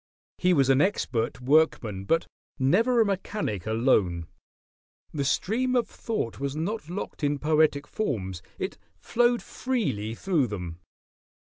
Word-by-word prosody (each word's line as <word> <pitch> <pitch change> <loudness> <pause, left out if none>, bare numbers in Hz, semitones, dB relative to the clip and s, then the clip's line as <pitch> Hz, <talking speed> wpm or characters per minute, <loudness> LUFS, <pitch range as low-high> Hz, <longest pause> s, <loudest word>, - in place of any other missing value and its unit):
He 180 - +3
was 135 -2 +4
an 135 +1 +4
expert 125 - 0
workman; 125 -8 +2
but 165 +9 +2 0.3
never 220 - +3
a - - +4
mechanic 195 - -2
alone. 110 -7 +2 0.9
The 145 - -1
stream 235 - +1
of 245 - +2
thought 215 - -4
was 140 0 -2
not 165 +2 -3
locked 180 -3 -5
in 145 0 +2
poetic 150 -1 +2
forms: 100 - -3 0.2
it - - -4 0.2
flowed 240 0 +2
freely 115 - -2
through 165 -4 +1
them. 90 -5 -6
145 Hz, 130 wpm, -27 LUFS, -, 0.9 s, was